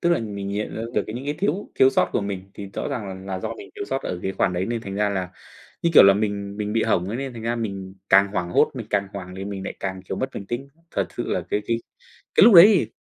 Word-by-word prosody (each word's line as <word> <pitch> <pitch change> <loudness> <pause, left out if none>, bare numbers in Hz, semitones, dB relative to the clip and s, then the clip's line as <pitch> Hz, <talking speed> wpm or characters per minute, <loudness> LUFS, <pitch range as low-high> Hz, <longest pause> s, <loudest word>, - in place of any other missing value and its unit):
Tức 170 - +2
là 170 - +3
mình 100 -3 -5
nhận 105 +2 -3
ra 110 - -3
được - - +1
những 120 +5 -6
cái 145 +1 -2
thiếu 200 +1 -1
thiếu 130 0 +5
sót 90 - +2
của - - +1
mình, 100 -1 -5
thì 100 -1 -8
rõ - - -3
ràng 95 -4 -5
nà 95 -1 -3
do - - -4
mình 400 - -10
thiếu 405 -1 -4
sót 135 - -3
ở 90 - -3
cái 95 - -2
khoản 90 - +1
đấy 90 +2 -1
nên 115 -1 -2
thành 100 -3 -6
ra 105 +1 +1
là 95 -2 -2 0.5
như 170 - +3
kiểu - - +11
là 100 0 +7
mình 100 -1 -2
mình 105 0 -3
bị 115 - +2
hỏng 90 +2 +1
ấy, 115 - -3
nên 135 -1 -4
thành 115 -2 -8
ra 120 +1 -1
mình 100 -4 -5
càng 100 +1 +6
hoảng 90 -3 -2
hốt, 150 - +4
mình 115 -4 -6
càng 100 -1 0
hoảng 90 -2 -7
thì 95 - -5
mình 100 -1 -5
lại - - -5
càng, 95 -1 -4
kiểu, 95 - -5
mất 130 - -1
bình 100 - -6
tĩnh. 130 +4 -4 0.2
Thật 100 -2 -1
sự - - -2
là - - 0
cái 105 - 0
cái 115 - +1 0.6
cái - - +8
lúc 225 -1 +8
đấy 170 +2 +12
thì 205 -5 +2
100 Hz, 295 wpm, -23 LUFS, 95-120 Hz, 0.6 s, đấy